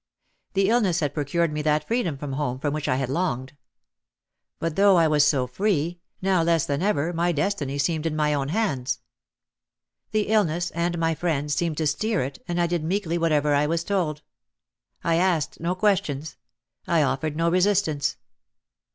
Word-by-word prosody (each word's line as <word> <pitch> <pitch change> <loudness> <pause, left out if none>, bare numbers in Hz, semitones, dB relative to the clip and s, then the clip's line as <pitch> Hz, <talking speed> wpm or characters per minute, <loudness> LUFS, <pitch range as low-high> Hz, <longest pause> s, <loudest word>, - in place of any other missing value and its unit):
The 195 0 +2
illness 205 -8 +2
had 145 -3 -1
procured 155 +2 0
me 150 - -2
that 150 0 +1
freedom 225 - 0
from 140 0 -5
home 135 -3 -2
for 145 +2 -2
which 150 0 -3
I 130 - +2
had 135 0 -1
longed. 135 -3 -2 1.0
But 165 -1 -3
though 200 -1 +5
I 165 -1 +5
was 150 -1 +4
so 140 -4 +2
free, 170 - -1 0.2
now 190 -2 +3
less 165 -2 +2
than 145 +2 -1
ever 175 -4 0
my 170 +1 +1
destiny 150 -4 -1
seemed 155 +2 0
in 155 - -2
my 150 -1 +1
own 140 -2 -1
hands. 145 - -1 1.1
The 215 -1 0
illness 175 -5 +1
and 170 +1 -1
my 165 0 +1
friends 150 -3 -1
seemed 165 0 -1
to 160 - 0
steer 195 - 0
it 140 - -7
and 175 -1 -1
I 175 - +3
did 170 -2 -1
meekly 175 0 -1
whatever 150 -3 +2
I 145 +1 +3
was 165 +1 0
told. 165 -6 -1 0.8
I 165 -1 +2
asked 175 -4 +1
no 175 +3 -1
questions. 160 -8 0 0.5
I 165 -3 +3
offered 145 +2 -1
no 165 +1 +1
resistance. 180 -5 +1
165 Hz, 175 wpm, -25 LUFS, 145-175 Hz, 1.1 s, though